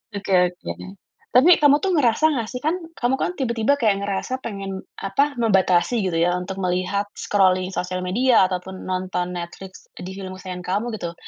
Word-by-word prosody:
Oke 195 -1 -3 0.2
oke. 130 - -7 0.6
Tapi 300 +7 +6
kamu 290 0 +6
tuh 380 +3 -1
ngerasa 265 -1 +3
nggak 230 -4 -2
sih 250 - -5
kan, 320 - +2 0.2
kamu 245 +2 +1
kan - - 0
tiba-tiba 240 +1 +1
kayak 205 -5 +1
ngerasa 205 +6 -3
pengen 195 -4 -5 0.2
apa, 275 +8 0
membatasi 195 0 +2
gitu 180 -4 -1
ya 175 +1 +2
untuk 190 +1 -6
melihat 185 +2 -1
scrolling 185 -2 +2
sosial 185 -1 -3
media 205 +1 +3
ataupun 185 +1 -5
nonton 185 -1 -2
Netflix 185 +2 -9
di 180 - -8
film 185 -1 -6
kesayangan 185 -1 -8
kamu, 200 +5 -1
gitu. 170 -3 -5
195 Hz, 170 wpm, -22 LUFS, 185-235 Hz, 0.6 s, Tapi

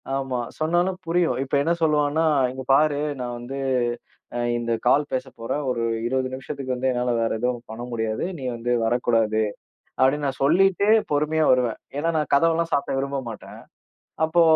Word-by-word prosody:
ஆமா, 135 -2 -2 0.2
சொன்னாலும் 175 +4 +1
புரியும். 170 0 +1
இப்ப 130 - -17
என்ன 165 +3 +2
சொல்லுவான்னா, 150 +1 +2 0.3
"இங்க 130 0 -7
பாரு 145 +1 +3 0.2
நான் 120 -1 -4
வந்து 135 +3 -6 0.8
அ - - -1 0.2
இந்த 120 0 -3
கால் 140 +4 +5
பேசப்போறேன். 130 0 -3
ஒரு 120 -2 -1 0.2
20 130 +1 0
நிமிஷத்துக்கு 130 0 -4
வந்து 130 +1 -1
என்னால 125 0 -1
வேற 115 0 0
எதும் 125 0 -1
பண்ண 110 +2 -7
முடியாது. 110 -2 -2
நீ 135 - -8
வந்து 120 +1 -3
வரக்கூடாது." 115 -2 +2 0.6
அப்டின்னு 145 +3 +3
நான் 135 -1 -4
சொல்லிட்டு 195 +6 +3 0.2
பொறுமையா 155 +2 +2
வருவேன். 125 -3 +2 0.2
ஏனா, 165 +3 0
நான் 150 - -1
கதவெல்லாம் 165 +3 +3
சாத்த 140 -1 0
விரும்ப 140 +1 -2
மாட்டேன். 110 - -10 0.7
அப்போ 160 +2 +3
135 Hz, 155 wpm, -24 LUFS, 120-155 Hz, 0.8 s, கால்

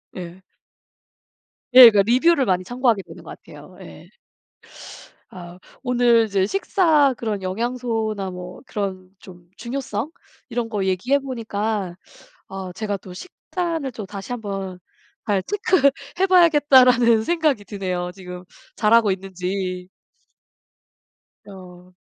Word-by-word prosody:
예. 180 0 -9 1.3
예. 250 -2 +11
그 210 - 0
리뷰를 260 +9 +3
많이 185 -4 0
참고하게 245 -3 0
되는 - - -13
것 - - -10
같아요. - - -14
예. - - -13 1.2
아. 175 -1 -11 0.2
오늘 240 -2 +3
이제 195 -2 0
식사 315 - +2
그런 210 -4 -4
영양소나 220 -1 -3
뭐 180 0 -9
그런 190 -3 -5
좀 175 -2 -15
중요성? 250 +2 -4 0.4
이런 235 -1 -3
거 205 -3 -2
얘기해 190 +10 +1
보니까 220 -7 -4 0.5
어 190 -1 -7
제가 205 +1 -3
또 185 0 -12
'식단을 330 - -5
또 215 -3 -7
다시 200 +5 -8
한번 195 -5 -5 0.5
잘 200 -3 +1
체크해 345 - 0
봐야겠다.'라는 260 -10 +5
생각이 305 -7 0
드네요. 185 -3 -4
지금 180 -1 -10 0.3
잘하고 220 -1 +4
있는지. 185 -1 -5 1.6
어. 180 -2 -14
215 Hz, 230 characters per minute, -21 LUFS, 185-255 Hz, 1.6 s, 예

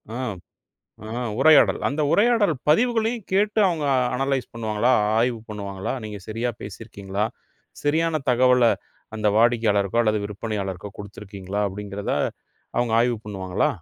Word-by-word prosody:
ஆ, - - -3 0.9
ஆ, - - -7 0.3
உரையாடல். 155 0 +6
அந்த 150 +2 -1
உரையாடல் 215 -5 +3
பதிவுகளையும் 225 +4 +2
கேட்டு 210 +3 +2
அவங்க 165 -4 -2 0.3
அனலைஸ் 135 0 -1
பண்ணுவாங்களா? 115 +1 +1 0.3
ஆய்வு 120 0 +1
பண்ணுவாங்களா? 100 -3 -4
நீங்க 105 -1 -6
சரியா 115 +3 -1
பேசி 100 - -8
இருக்கீங்களா? 100 -2 -3 0.6
சரியான 155 +2 +1
தகவல 125 0 +4 0.5
அந்த 110 -1 +1
வாடிக்கையாளருக்கோ 115 -2 +3
அல்லது 110 -1 +1
விற்பனையாளருக்கோ 100 -2 -4
குடுத்திருக்கீங்களா 100 -1 -6
அப்படிங்கிறத 100 +1 -5 0.6
அவங்க 120 -1 +1
ஆய்வு 120 0 +2
பண்ணுவாங்களா? 95 -3 -1
115 Hz, 115 wpm, -23 LUFS, 100-145 Hz, 0.9 s, உரையாடல்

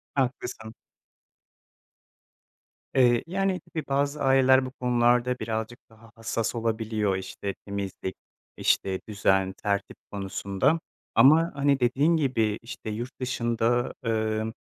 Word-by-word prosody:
Haklısın. 125 -4 -2 2.2
Eee, 120 -3 +4
yani, 190 +1 0
tabii, 160 - -7
bazı 140 +1 0
aileler 130 -1 +5
bu 130 - -6
konularda 125 0 +2
birazcık 110 +2 -4
daha 115 0 -18
hassas 115 0 -2
olabiliyor, 110 -3 -1
işte, 95 +1 -5
temizlik, 100 -2 -4 0.4
işte, 95 -1 +1
düzen, 95 -2 +1
tertip 100 -1 -1
konusunda 100 - 0 0.4
ama, 160 +5 +6
hani, 140 0 +2
dediğin 140 +7 +3
gibi, 115 -8 0
işte, 115 -1 -8
yurt 120 +4 -6
dışında, 120 -1 0
emm, 110 -1 -1
120 Hz, 105 wpm, -26 LUFS, 110-130 Hz, 2.2 s, ama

